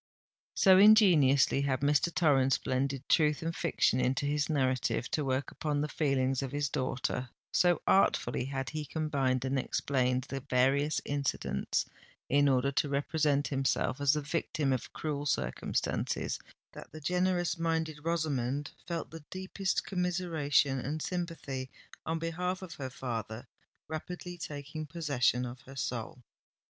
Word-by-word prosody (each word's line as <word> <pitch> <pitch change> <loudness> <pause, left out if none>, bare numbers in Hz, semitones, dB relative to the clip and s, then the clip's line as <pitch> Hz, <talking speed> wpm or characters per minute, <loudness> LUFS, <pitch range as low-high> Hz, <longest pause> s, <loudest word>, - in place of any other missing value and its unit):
So 190 -2 +6
ingeniously 175 - +6
had 135 -2 0
Mr. 145 +4 +2
Torrens 135 -6 +3
blended 135 +1 -2
truth 150 -1 +3
and 165 +1 -2
fiction 160 -6 +1
in 125 +1 +1
his 145 +1 0
narrative, 130 -3 0
to 150 - 0
work 130 0 -1
upon 150 -2 -2
the 150 - 0
feelings 135 -4 0
of 135 -2 -4
his 145 -1 -1
daughter,—so 130 +5 -1
artfully 125 -10 +2
had 135 0 -4
he 155 -1 -3
combined 140 -5 -1
and 135 +1 0
explained 130 -1 0
the 135 +1 -5
various 135 +4 +2
incidents 140 -2 -1 0.4
in 145 +1 +4
order 135 +1 +2
to 145 +1 0
represent 145 0 +1
himself 135 0 0
as 140 0 +4
the 150 - 0
victim 145 -2 -1
of 125 - -4
cruel 145 -2 -3
circumstances—that 65 - -3
the 155 - -9
generous 180 +2 0
minded 160 -2 -1
Rosamond 145 -4 -1 0.2
felt 170 -2 -4
the 165 -1 -9
deepest 190 +1 -2
commiseration 165 -7 +1
and 145 +5 -3
sympathy 160 -7 -4 0.4
on 165 +1 0
behalf 180 +3 -2
of 175 -3 -7
her 135 -5 -5
father 120 -2 -5 0.4
rapidly 175 +3 -6
taking 150 0 -6
possession 140 -6 +1
of 125 +2 -8
her 135 0 -13
soul. 125 -1 -4
145 Hz, 135 wpm, -31 LUFS, 130-160 Hz, 0.4 s, So